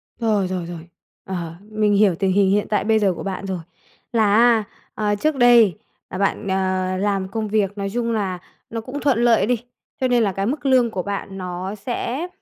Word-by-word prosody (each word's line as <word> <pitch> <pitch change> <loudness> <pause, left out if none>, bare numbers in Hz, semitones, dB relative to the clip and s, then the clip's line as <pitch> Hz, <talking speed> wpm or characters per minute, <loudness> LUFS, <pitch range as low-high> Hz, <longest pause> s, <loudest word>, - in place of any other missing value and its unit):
Rồi, 215 -5 +1
rồi, 180 -2 -3
rồi, 170 -1 -9 0.4
ờ, 170 -3 -5 0.2
mình 215 -1 +2
hiểu 200 -4 +4
tình 190 +2 0
hình 195 0 +3
hiện 205 +1 +1
tại 210 - +1
bây 220 0 +3
giờ 195 -3 +2
của 165 - -7
bạn 195 0 -4
rồi 190 -2 -3 0.5
là 215 -3 +3
á, 230 -1 +5 0.3
à, 210 -1 0
trước 305 +8 0
đây 240 - +5 0.3
là 185 - -5
bạn, 200 0 -1
ờ, 185 -1 0
làm 195 -1 0
công 220 +2 -3
việc 205 -1 0
nói 195 0 -2
chung 235 -1 -1
là 190 -5 -2 0.3
nó 225 -1 -4
cũng 265 +5 -6
thuận 260 -5 +2
lợi 230 -5 +4
đi, 245 +2 +1 0.4
cho 260 - +3
nên 245 -2 +3
là 200 - +1
cái 195 +2 -2
mức 280 +5 -3
lương 255 -3 +4
của 185 -4 -3
bạn 200 -1 -5
nó 185 +2 -5
sẽ, 245 - -3
205 Hz, 215 wpm, -21 LUFS, 190-230 Hz, 0.5 s, á